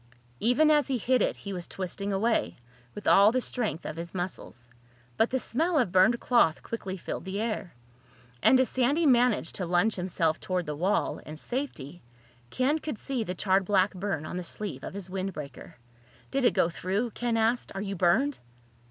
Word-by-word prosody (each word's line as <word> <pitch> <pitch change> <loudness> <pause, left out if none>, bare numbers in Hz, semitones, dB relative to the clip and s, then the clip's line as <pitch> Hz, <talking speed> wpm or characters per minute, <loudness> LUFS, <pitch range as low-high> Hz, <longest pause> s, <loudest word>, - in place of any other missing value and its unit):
Even 270 +8 +4
as 295 -3 +3
he 265 - 0
hit 250 +2 +2
it - - +1
he 200 - -7
was 175 -2 -4
twisting 195 +2 -4
away, 220 +4 +1 0.4
with 210 - -8
all 200 +2 +6
the 255 - +1
strength 225 -9 -3
of 155 - -5
his 170 +2 -7
muscles. 175 -9 -5 0.5
But 225 - +2
the 260 - 0
smell 320 +8 0
of 245 -10 +2
burned 190 +7 +4
cloth 205 -10 +2
quickly 195 -4 -5
filled 170 - -5
the 190 +2 -4
air. 215 - -3 0.7
And 260 - +6
as 260 - +3
Sandy 275 +6 +1
managed 245 - +3
to 185 - -2
lunge 180 +6 +2
himself 170 -3 0
toward 180 -2 -2
the 150 - -4
wall, 185 +7 0
and 155 0 -9
safety, 175 - -5 0.5
Ken 275 - +1
could 300 -7 -5
see 255 0 -2
the 180 -3 -4
charred 190 +1 +2
black 195 +1 +2
burn 185 -4 -3
on 175 - -5
the 180 - -3
sleeve 170 -6 -5
of - - -7
his 200 -2 -6
windbreaker. 185 -7 -6 0.6
"Did 275 -1 +1
it - - +4
go - - +4
through?" 195 +7 -2
Ken 235 +1 -1
asked. 225 +2 +1
"Are 195 - -3
you 200 -1 -4
burned?" 190 +11 +2
200 Hz, 190 wpm, -28 LUFS, 180-245 Hz, 0.7 s, all